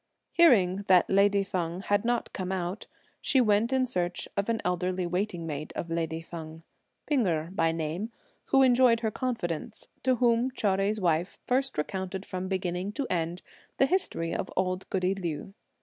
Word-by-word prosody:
Hearing 205 - +5
that 185 -2 +5
lady 200 +1 +4
Feng 180 -2 -3
had 205 0 +1
not 240 0 -1
come 185 -1 -3
out, 185 +1 -3 0.3
she 265 - +3
went 220 0 +3
in 260 -1 +3
search 180 -7 -2
of 200 +2 -1
an 230 -1 +1
elderly 180 0 0
waiting 180 -1 -2
maid 155 -1 -5
of 170 - -4
lady 165 -1 -2
Feng, 160 -1 -9 0.4
P'ing 265 -8 +2
Erh 165 0 -1
by 165 -4 +2
name, 165 +7 -3 0.3
who 270 0 +4
enjoyed 245 -2 +5
her 220 -2 0
confidence, 220 - -4
to 255 -1 +3
whom 240 +1 +3
Chou 235 -5 0
Jui's 195 +3 +1
wife 175 -1 0
first 265 - 0
recounted 190 +4 -3
from 185 0 -4
beginning 185 0 -2
to 275 +4 -2
end 170 0 -1 0.3
the 270 - +5
history 270 - -1
of - - -3
old 185 0 -1
goody 185 0 +1
Liu. 175 -1 -5
190 Hz, 170 wpm, -28 LUFS, 175-230 Hz, 0.4 s, Hearing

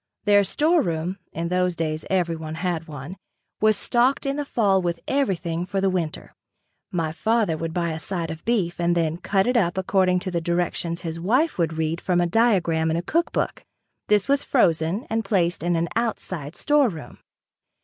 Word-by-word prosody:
Their 205 -1 +5
storeroom, 190 - +1
in 170 +1 -3
those 180 0 +1
days 155 -1 -2
everyone 165 -4 -1
had 170 -1 -2
one, 150 +4 -8 0.4
was 215 -1 +4
stocked 250 +6 +2
in 275 0 0
the 290 0 -2
fall 200 -7 +2
with 170 -1 -2
everything 175 -11 0
for 195 +2 -2
the 195 0 +2
winter. 170 -4 -3 0.6
My 165 -3 -1
father 220 0 +1
would 165 +1 -4
buy 170 -1 -1
a 160 - -4
side 165 0 -3
of 160 0 -8
beef 200 -8 0
and 175 0 +2
then 165 -1 0
cut 190 +2 +1
it 250 +1 +1
up 180 -6 +2
according 185 -1 +2
to 185 - -4
the 170 -1 -1
directions 170 0 -1
his 165 -1 -5
wife 250 - +1
would 165 -1 +1
read 160 +1 -2
from 180 -2 +1
a 175 - +3
diagram 170 -5 +2
in 160 - 0
a 170 - -2
cook 335 - 0
book. - - -2 0.4
This 210 -1 +3
was 280 0 +2
frozen 170 - +1
and 225 0 -1
placed 180 -4 +1
in 175 +1 +1
an 165 +1 0
outside 185 -9 -3
storeroom. 270 - 0
175 Hz, 185 wpm, -24 LUFS, 165-205 Hz, 0.6 s, Their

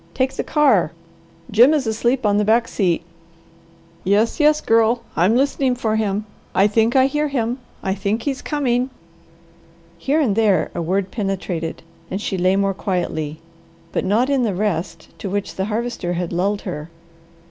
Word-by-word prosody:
Take 260 0 +1
the - - -3
car! 225 - +3 0.6
Jim 245 +8 +6
is 285 -4 0
asleep 235 +3 0
on 205 -1 +3
the 210 - +3
back 230 +3 +3
seat 175 -5 0 1.0
Yes, 205 - +2
yes, 300 0 +4
Girl! 230 0 +2
I'm 180 +8 +3
listening 270 -1 +1
for 220 -3 -1
him. 210 -1 -1 0.3
I 195 - +5
think 225 +3 +2
I 260 0 +6
hear 295 +2 0
him! 250 -2 -1 0.2
I 190 - 0
think 205 +3 -2
he's 275 -2 -2
coming!" 255 -4 0 1.1
Here 280 - +1
and 240 -10 +2
there 210 -6 +2
a 175 - -3
word 185 +3 -1
penetrated, 190 -7 -3 0.3
and 190 - -3
she 210 - -3
lay 185 +1 +2
more 195 0 +1
quietly, 160 -5 -3 0.5
but - - -1
not 215 +7 +2
in 275 -2 +1
the 215 -6 0
rest 175 -4 -2
to 200 - -4
which 200 +1 -3
the 190 - -2
Harvester 215 -4 -2
had 175 0 -3
lulled 200 +4 0
her. 160 -4 -6
210 Hz, 170 wpm, -20 LUFS, 190-245 Hz, 1.1 s, Jim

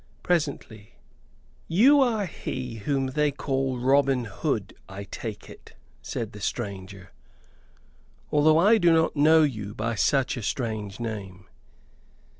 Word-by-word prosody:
Presently: 140 -11 -2 0.7
"You 260 - +5
are 225 -6 +1
he 130 -8 -6
whom 135 -2 0
they 150 +2 +1
call 135 -2 -2
Robin 135 0 +2
Hood, 105 - -3 0.2
I 100 +1 -7
take 105 +2 -7
it," - - -14 0.3
said 110 -2 -5
the 105 - -11
stranger, 95 -2 -5 1.2
"although 155 +1 +4
I 210 +7 +5
do 175 -3 +4
not 160 0 +2
know 155 +2 +5
you 105 -8 -3
by 115 +2 -2
such 135 +4 +1
a - - -4
strange 110 -3 -3
name." 100 -5 -6
130 Hz, 125 wpm, -26 LUFS, 105-155 Hz, 1.2 s, You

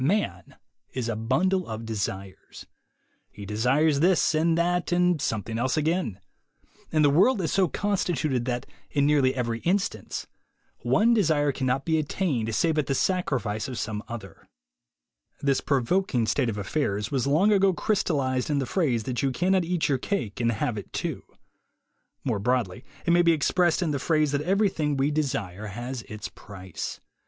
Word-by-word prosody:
Man 205 +9 -1 0.4
is 125 -3 -2
a 115 - -1
bundle 170 - +1
of 110 0 -5
desires. 100 -3 -5 0.6
He 105 - -10
desires 135 +9 +2
this, 175 +1 +3
and 165 +1 +2
that, 175 +1 0
and 180 -3 +2
something 110 -2 -2
else 130 +4 0
again. 155 - 0 0.7
And 155 -1 +3
the 145 - +5
world 195 - +4
is 165 -4 -1
so 190 -2 +3
constituted 155 - -1
that, 125 -1 -2 0.2
in 140 -1 +1
nearly 140 -3 +3
every 115 -3 -2
instance, 195 - -1 0.5
one 235 +2 +3
desire 155 -9 +2
cannot 130 0 -1
be 160 -1 +2
attained 140 - -1
save 160 +5 +2
at 150 - -1
the 135 - 0
sacrifice 130 - -1
of 130 -3 -6
some 105 -2 -3
other. 120 -1 -9 0.9
This 140 -2 +1
provoking 140 -1 +1
state 120 +3 +1
of 105 - -3
affairs 105 0 -2
was 135 -1 0
long 170 +9 +4
ago 195 -1 +4
crystallized 150 - 0
in 145 - +1
the 135 - 0
phrase 130 - 0
that 125 +1 -2
you 135 - +2
cannot 185 +7 +2
eat 175 -1 0
your 135 -3 +1
cake 120 - -3
and 115 0 +2
have 110 +1 -2
it - - -11
too. - - -3 1.0
More 115 -6 -1
broadly, 115 -4 -1 0.2
it 170 - +2
may 175 +1 +5
be 170 -1 +4
expressed 175 +3 +2
in 160 - 0
the 140 - -1
phrase 155 0 +1
that 145 0 0
everything 175 -5 +1
we 135 +2 +1
desire 110 -10 -2
has 120 +5 -5
its 105 -1 -6
price. 95 -3 -8
140 Hz, 165 wpm, -26 LUFS, 115-170 Hz, 1.0 s, the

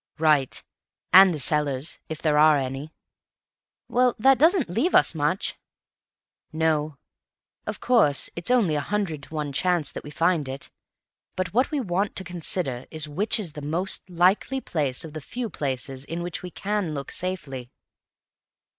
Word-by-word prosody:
"Right. 150 -4 +2 0.5
And 190 0 +9
the 160 - -3
cellars, 145 0 0
if 160 -1 -6
there 150 -2 +3
are 155 -1 +6
any." 135 +3 -4 1.0
"Well, 250 0 +2
that 265 +4 +4
doesn't 325 0 +4
leave 230 - 0
us - - +5
much." - - -1 0.9
"No. 155 -2 0 0.7
Of - - -4
course 215 - +3
it's 170 - -3
only 230 -10 +3
a 150 - +1
hundred 170 -2 -2
to 155 - -9
one 150 -2 -3
chance 175 -2 0
that - - -7
we - - -9
find 165 -2 +1
it, 135 +1 -6 0.6
but 185 0 -3
what 250 +4 +2
we 300 - -1
want 195 -3 -1
to 190 - -2
consider 170 -7 -2
is 155 -1 +1
which 200 +10 +1
is 175 -8 -3
the 150 - -7
most 175 +6 -1
likely 185 +9 +2
place 145 - -2
of 155 - -10
the 155 - -6
few 235 - -5
places 135 -1 -3
in 165 +4 -5
which 175 -1 -4
we 180 - -7
can 195 -4 -2
look 140 -1 -5
safely." 145 -9 -4
160 Hz, 165 wpm, -25 LUFS, 145-190 Hz, 1.0 s, And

